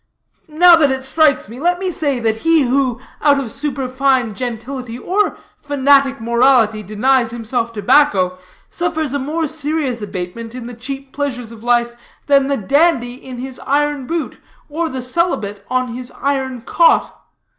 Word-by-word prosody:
Now 340 +3 +6
that 295 -4 +3
it 265 0 -2
strikes 285 -1 +2
me, 235 +4 -10
let 350 +4 +1
me 370 0 -2
say, 285 -5 -1
that 225 -1 0
he 325 +4 +3
who, 255 -1 0 0.2
out 285 -1 +4
of 250 -5 -4
superfine 260 -4 0
gentility 245 +1 -5
or 390 +10 0 0.2
fanatic 275 -2 +3
morality, 235 -2 +3
denies 235 +4 +1
himself 230 0 -2
tobacco, 200 -5 +2 0.3
suffers 315 -5 -2
a 285 - 0
more 310 +5 -2
serious 295 -5 -2
abatement 205 +4 -6
in 250 -2 -7
the 245 - -7
cheap 270 +3 -8
pleasures 250 -5 -4
of 225 -1 -12
life 240 0 +2 0.3
than 275 -1 +3
the 280 0 0
dandy 265 - +2
in 255 0 -10
his 255 +1 -6
iron 290 -1 0
boot, 335 -1 -3 0.3
or 325 +2 -2
the 260 -3 -5
celibate 250 - -1
on 255 0 0
his 250 +1 -7
iron 265 -3 -2
cot. 335 +8 +2
265 Hz, 155 wpm, -17 LUFS, 235-290 Hz, 0.3 s, Now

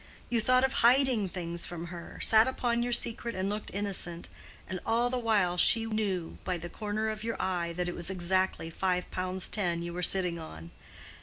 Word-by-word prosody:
You 235 -2 +2
thought 255 +3 +4
of 265 0 +2
hiding 245 -4 +4
things 170 -1 -4
from 170 -1 -6
her—sat 220 +6 +3
upon 240 -2 0
your 245 0 -1
secret 235 0 0
and 190 +1 -1
looked 210 +1 -4
innocent, 190 -4 -2 0.4
and 185 - -4
all 240 +2 +1
the 255 - 0
while 205 -7 +1
she 225 +6 +5
knew 205 -6 -2
by 180 -1 -2
the 175 +1 -7
corner 215 +3 -3
of 215 0 -5
your 230 0 -3
eye 175 -2 -1
that 180 +1 -2
it 175 - -3
was 170 - 0
exactly 185 -2 0
five 180 +1 -1
pounds 185 0 -2
ten 175 -5 -1
you 170 0 -5
were 180 - -4
sitting 180 -1 +2
on! 85 - -10
190 Hz, 190 wpm, -29 LUFS, 175-225 Hz, 0.4 s, she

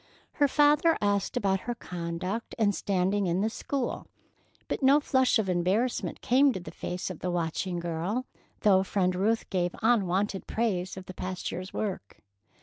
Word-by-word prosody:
Her 290 - +3
father 295 +3 +4
asked 205 -1 0
about 195 -1 +1
her 240 - -1
conduct 180 +3 -4
and 210 -2 +3
standing 195 +1 0
in 175 +2 +1
the 220 +2 0
school, 270 +1 -3 0.6
but - - -3
no 275 +2 +6
flush 260 -4 +3
of 220 -3 0
embarrassment 185 +7 0
came 270 +3 +4
to 190 - -4
the 175 - -9
face 180 +1 -4
of 175 - -8
the 180 - -2
watching 175 +1 -2
girl, 175 +8 -2 0.4
though 195 -3 +5
Friend 185 -1 0
Ruth 215 +5 0
gave 180 -2 0
unwonted 200 -3 +1
praise 190 -5 -1
of 185 - -8
the 185 - -8
past 185 0 -4
year's 185 +2 -6
work. 190 - -4
195 Hz, 165 wpm, -28 LUFS, 180-230 Hz, 0.6 s, no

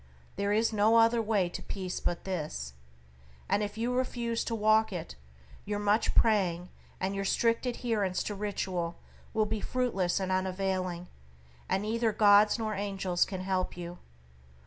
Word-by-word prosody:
There 200 0 -1
is 220 +2 +2
no 215 +2 +4
other 230 +1 +5
way 210 -4 +1
to - - -6
peace 185 -2 -4
but 175 - -2
this, 150 - -4 0.7
and 205 - +1
if 205 0 -4
you 235 +2 -1
refuse 240 -2 -1
to 230 - -2
walk 215 0 +3
it, 175 - -5 0.5
your 205 0 -3
much 205 +2 +1
praying 180 -5 +2 0.3
and 190 +1 -1
your 195 0 -2
strict 230 +5 +1
adherence 220 -6 -1
to 210 - -3
ritual 190 -4 -3 0.4
will 215 -1 +2
be 215 0 -3
fruitless 205 -8 0
and 190 -1 -2
unavailing, 185 -1 -1 0.6
and 195 - +1
neither 225 +1 +1
gods 210 0 +5
nor 220 -2 -2
angels 195 -3 0
can 190 -2 -5
help 185 -1 -1
you. 175 0 -7
205 Hz, 155 wpm, -30 LUFS, 185-220 Hz, 0.7 s, other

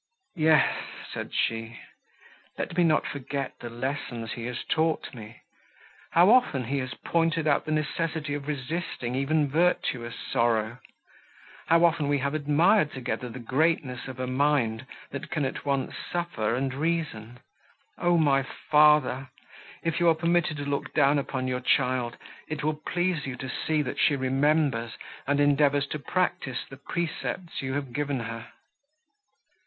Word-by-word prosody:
"Yes," 160 -1 +4 0.3
said - - -5
she, 115 +1 -1 0.8
"let - - -3
me 180 - +4
not 155 -2 +3
forget 140 -1 -4
the 120 - -6
lessons 120 -2 -4
he 115 - -5
has 125 0 -4
taught 160 -1 0
me! 115 -2 -11 0.7
How 175 +5 +7
often 240 - +4
he 135 +4 -1
has 130 -3 -4
pointed 165 -1 0
out 145 -2 +2
the 155 - -3
necessity 155 0 -1
of 145 0 -4
resisting 145 -3 -3
even 145 +3 +1
virtuous 140 -6 0
sorrow; 115 0 0 0.9
how 165 +1 +5
often 160 -3 +2
we 145 0 +2
have 140 +1 -1
admired 155 +4 +3
together 125 -1 -4
the 115 - -8
greatness 130 +1 0
of 130 -1 -8
a 130 - -1
mind, 130 -3 +1 0.2
that 140 - -6
can 150 -4 -1
at 130 - -4
once 140 -2 0 0.2
suffer 170 -11 -1
and 135 +1 -1
reason! 140 -7 -2 0.6
O 175 0 +3
my 140 -4 +4
father! 150 -2 +3 0.5
if 165 0 0
you 175 -1 +5
are 165 - +4
permitted 170 -1 +1
to 145 - -4
look 140 0 -3
down 145 0 +4
upon 130 -2 -3
your 125 0 -1
child, 125 -2 +1 0.3
it 150 -1 -4
will 155 0 -1
please 175 -5 0
you 130 - -4
to 130 +1 -6 0.2
see, 155 -1 +2
that 125 - -4
she 145 - +4
remembers, 135 -2 +1 0.3
and 145 +1 +2
endeavours 145 -1 +3
to 150 - -3
practise, 140 -5 -1
the 135 - -11
precepts 170 +3 -4
you 130 -1 -3
have 140 -3 -3
given 145 -2 -1
her." 115 +1 -6
140 Hz, 155 wpm, -27 LUFS, 130-155 Hz, 0.9 s, How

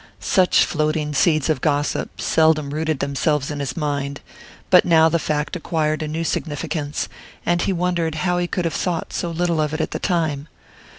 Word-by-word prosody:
Such 185 -2 +4
floating 155 -1 -1
seeds 155 0 +2
of 155 -6 0
gossip 145 -1 -1
seldom 155 -3 +2
rooted 155 -1 -1
themselves 140 +1 0
in 145 - -4
his 135 -3 -4
mind, 145 -2 -2 0.5
but 180 - +8
now 160 -2 +5
the 170 +1 +1
fact 150 +2 -2
acquired 155 -2 -1
a 155 - -2
new 160 +2 -2
significance, 150 -1 -2 0.4
and 175 0 +2
he - - 0
wondered 175 -3 0
how 180 -1 +1
he 175 - 0
could 180 -1 -2
have 165 - -1
thought 175 -3 -2
so 175 - -2
little 170 -1 0
of 150 0 -1
it - - -4
at 160 - -1
the - - -3
time. 160 -5 -1
155 Hz, 185 wpm, -21 LUFS, 150-170 Hz, 0.5 s, but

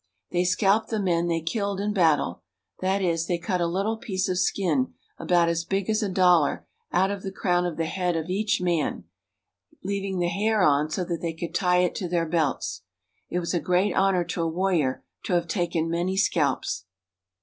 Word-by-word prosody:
They 180 0 +1
scalped 200 +4 +2
the 220 - -1
men 175 -3 +1
they 165 -1 0
killed 200 +3 -2
in 205 +1 -1
battle; 155 - +2 0.4
that 190 +1 0
is, 165 -2 0
they 175 - 0
cut 180 0 -2
a - - +2
httle 195 +6 -1
piece 190 -2 -1
of 180 -1 0
skin, 170 -8 0 0.2
about 175 -1 +3
as 170 0 0
big 195 +4 -1
as 215 +1 +1
a 205 - -1
dollar, 180 -4 +3 0.3
out 190 +2 +2
of 200 -1 -4
the 190 - -5
crown 180 -2 +1
of 170 - -5
the 165 - 0
head 180 +1 -1
of 160 0 -2
each 205 +4 0
man, 175 -4 -1 0.8
leaving 195 -1 -2
the 175 -1 +1
hair 210 +1 +1
on 150 -2 +3
so 180 - -2
that 170 -2 -3
they 165 -1 -2
could 165 +1 -6
tie 180 -1 +3
it 180 - 0
to 180 -4 -3
their 170 -1 +1
belts. 160 -3 -1 0.5
It - - -2
was 175 0 -2
a 175 - +2
great 180 +5 +1
honor 190 -2 +2
to 170 - -3
a 165 - +1
warrior 165 -6 0 0.2
to 185 - -1
have 170 -1 +1
taken 170 -2 -1
many 175 +3 -1
scalps. 145 - 0
180 Hz, 205 wpm, -25 LUFS, 170-195 Hz, 0.8 s, about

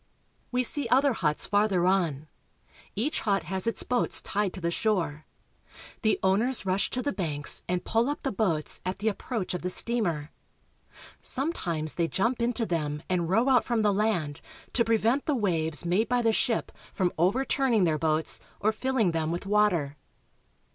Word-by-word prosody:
We 250 0 +1
see 270 +1 0
other 270 +1 +4
huts 150 -8 0
farther 205 -3 +2
on. 165 -6 +1 0.7
Each 265 +9 -1
hut 195 -5 0
has 190 +6 -2
its 230 - 0
boats 245 -1 +2
tied 200 -1 -1
to - - -7
the 170 -1 -1
shore. 170 -7 -1 0.7
The 220 - +2
owners 215 +6 +1
rush 190 +1 0
to 250 - -3
the 285 - 0
banks 150 -6 +1
and 180 0 -1
pull 230 +4 +1
up 290 - -4
the 270 - -1
boats 180 -7 -1
at 185 +1 -3
the 215 +2 0
approach 215 -2 -4
of 180 - -3
the 180 - -2
steamer. 180 -9 -1 0.9
Sometimes 170 - -1
they 170 -1 0
jump 230 +8 0
into 235 0 0
them 150 -4 -2
and 175 -3 0
row 225 +7 +3
out 255 -3 +4
from 230 -2 0
the 205 -1 +3
land 195 -9 -1 0.3
to 235 - +3
prevent 230 +4 +1
the 300 - +2
waves 165 - +1
made 185 +6 +1
by 245 -1 +1
the 225 -1 +3
ship 230 +1 0 0.2
from 180 -3 0
overturning 245 - +2
their 160 -3 +1
boats 155 0 +1 0.2
or 215 - +2
filling 230 -4 0
them 160 -1 -1
with 175 +3 -4
water. 190 -9 +1
200 Hz, 175 wpm, -27 LUFS, 170-235 Hz, 0.9 s, other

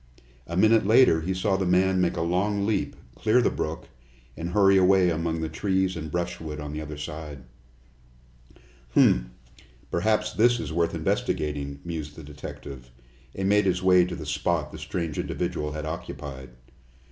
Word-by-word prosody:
A 85 - -4
minute 110 +3 +5
later 110 -5 +5
he 90 +4 -2
saw 95 +2 0
the 95 - -1
man 95 +1 +3
make 90 - 0
a - - 0
long 100 +4 0
leap, 105 -2 -1 0.2
clear 110 - +2
the 125 - +2
brook, - - -4 0.5
and 85 +1 -4
hurry 95 +1 +4
away 95 -1 +5
among 80 0 -2
the 80 - -1
trees 95 +3 0
and 80 -2 -5
brushwood 85 -2 -4
on 75 0 -6
the 75 - -4
other 75 -1 -7
side. 75 -3 -7 1.5
"Humph! - - +4 0.6
Perhaps 105 +4 +1
this 120 +2 +3
is 95 - -5
worth 85 0 0
investigating," 70 -2 -2
mused 80 -3 -5
the 80 - -10
detective, 70 -3 -9 0.5
and 95 0 -1
made 105 0 +4
his 90 -1 0
way 90 -1 +6
to 90 - -5
the 75 - -7
spot 75 +1 -1
the - - -9
strange 85 -3 -4
individual 75 0 -3
had 75 0 -5
occupied. 70 -4 -7
85 Hz, 165 wpm, -26 LUFS, 75-95 Hz, 1.5 s, way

